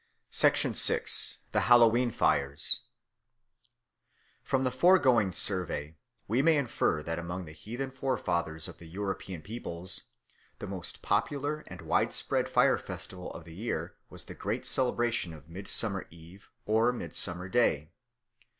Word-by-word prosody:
6. -, -, +4 dB, 0.9 s
The -, -, +2 dB
Hallowe'en 120 Hz, +1 st, +5 dB
Fires 70 Hz, -9 st, +4 dB, 1.6 s
FROM 135 Hz, -1 st, -1 dB
THE 130 Hz, -, 0 dB
FOREGOING 130 Hz, -, +4 dB
survey 85 Hz, -5 st, -1 dB, 0.3 s
we 115 Hz, +6 st, +1 dB
may 160 Hz, +1 st, +4 dB
infer 120 Hz, -, 0 dB
that 80 Hz, +2 st, -3 dB
among 85 Hz, +2 st, -5 dB
the 75 Hz, -, -10 dB
heathen 120 Hz, +11 st, -6 dB
forefathers 90 Hz, -, -2 dB
of -, -, -12 dB
the 85 Hz, -, -12 dB
European 95 Hz, -2 st, -5 dB
peoples 95 Hz, -5 st, -1 dB, 0.5 s
the -, -, -7 dB
most 95 Hz, -3 st, -7 dB
popular 145 Hz, +8 st, -1 dB
and -, -, -10 dB
widespread -, -, 0 dB
fire -, -, +3 dB
festival 90 Hz, -1 st, -7 dB
of 85 Hz, -, -10 dB
the 85 Hz, -, -12 dB
year 85 Hz, -4 st, -4 dB, 0.2 s
was -, -, -9 dB
the -, -, -10 dB
great -, -, -4 dB
celebration 120 Hz, -8 st, 0 dB
of 75 Hz, -1 st, -14 dB
Midsummer 100 Hz, +2 st, -1 dB
Eve 85 Hz, +4 st, -16 dB, 0.2 s
or 110 Hz, +3 st, +2 dB
Midsummer 90 Hz, -6 st, -3 dB
Day. 85 Hz, -8 st, +1 dB
100 Hz, 130 wpm, -29 LUFS, 85-120 Hz, 1.6 s, Hallowe'en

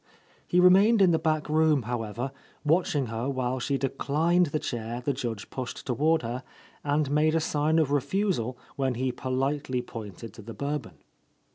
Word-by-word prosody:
He 180 Hz, -, +3 dB
remained 195 Hz, +5 st, +6 dB
in 190 Hz, -3 st, +6 dB
the 160 Hz, -, +2 dB
back 155 Hz, -1 st, 0 dB
room, 155 Hz, -3 st, +3 dB
however, 120 Hz, +2 st, -3 dB, 0.3 s
watch 165 Hz, +2 st, +2 dB
ing 140 Hz, -2 st, +1 dB
her 115 Hz, +3 st, -3 dB
while 130 Hz, -1 st, -1 dB
she 135 Hz, +3 st, 0 dB
declined 160 Hz, +6 st, +1 dB
the 150 Hz, -, -1 dB
chair 120 Hz, -4 st, -4 dB
the 140 Hz, +3 st, -1 dB
Judge 120 Hz, -5 st, -4 dB
pushed 130 Hz, -1 st, -5 dB
toward 150 Hz, +4 st, +2 dB
her 120 Hz, +2 st, -3 dB, 0.4 s
and 145 Hz, -1 st, +1 dB
made 155 Hz, +2 st, +3 dB
a -, -, +4 dB
sign 155 Hz, 0 st, +1 dB
of 155 Hz, -4 st, +2 dB
refusal 145 Hz, -, 0 dB, 0.2 s
when 135 Hz, -2 st, 0 dB
he 130 Hz, +2 st, 0 dB
politely 130 Hz, 0 st, -1 dB
pointed 110 Hz, -1 st, -8 dB
to -, -, -11 dB
the 115 Hz, +2 st, -9 dB
Bourbon. 140 Hz, -3 st, -4 dB
140 Hz, 170 wpm, -27 LUFS, 125-155 Hz, 0.4 s, remained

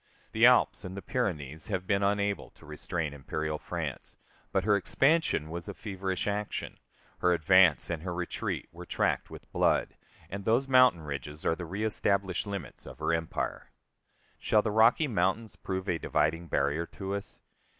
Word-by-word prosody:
The -, -, +6 dB
Alps -, -, +4 dB
and 95 Hz, +1 st, -7 dB
the 100 Hz, -, -6 dB
Pyrenees 80 Hz, -, -3 dB
have 95 Hz, -4 st, -2 dB
been 100 Hz, +1 st, +1 dB
unable 100 Hz, 0 st, 0 dB
to -, -, -19 dB
restrain 75 Hz, 0 st, -4 dB
imperial 75 Hz, +2 st, -3 dB
France; -, -, -5 dB, 0.3 s
but 95 Hz, -, +1 dB
her 105 Hz, +1 st, +4 dB
expansion 135 Hz, -, +2 dB
was 85 Hz, 0 st, -6 dB
a -, -, -6 dB
feverish 95 Hz, -3 st, -3 dB
action, 105 Hz, 0 st, -3 dB, 0.4 s
her 90 Hz, 0 st, +3 dB
advance 90 Hz, -3 st, +5 dB
and 85 Hz, -2 st, -3 dB
her 90 Hz, +1 st, -4 dB
retreat 90 Hz, 0 st, -3 dB
were -, -, -10 dB
tracked -, -, 0 dB
with -, -, -12 dB
blood, -, -, +2 dB, 0.3 s
and 100 Hz, +1 st, -6 dB
those 120 Hz, +6 st, +2 dB
mountain 125 Hz, -11 st, +5 dB
ridges 75 Hz, +1 st, -6 dB
are 80 Hz, -, +2 dB
the 85 Hz, -, -6 dB
reëstablished 100 Hz, 0 st, -1 dB
limits 100 Hz, -5 st, -6 dB
of -, -, -10 dB
her -, -, 0 dB
empire. 80 Hz, -1 st, -3 dB, 0.7 s
Shall 105 Hz, -1 st, +3 dB
the 110 Hz, -, -1 dB
Rocky 115 Hz, +8 st, +5 dB
Mountains 105 Hz, 0 st, 0 dB
prove 95 Hz, 0 st, -4 dB
a 85 Hz, -3 st, 0 dB
dividing 80 Hz, +3 st, 0 dB
barrier 75 Hz, +3 st, 0 dB
to 95 Hz, 0 st, -5 dB
us? 100 Hz, 0 st, -5 dB
95 Hz, 165 wpm, -30 LUFS, 80-100 Hz, 0.7 s, The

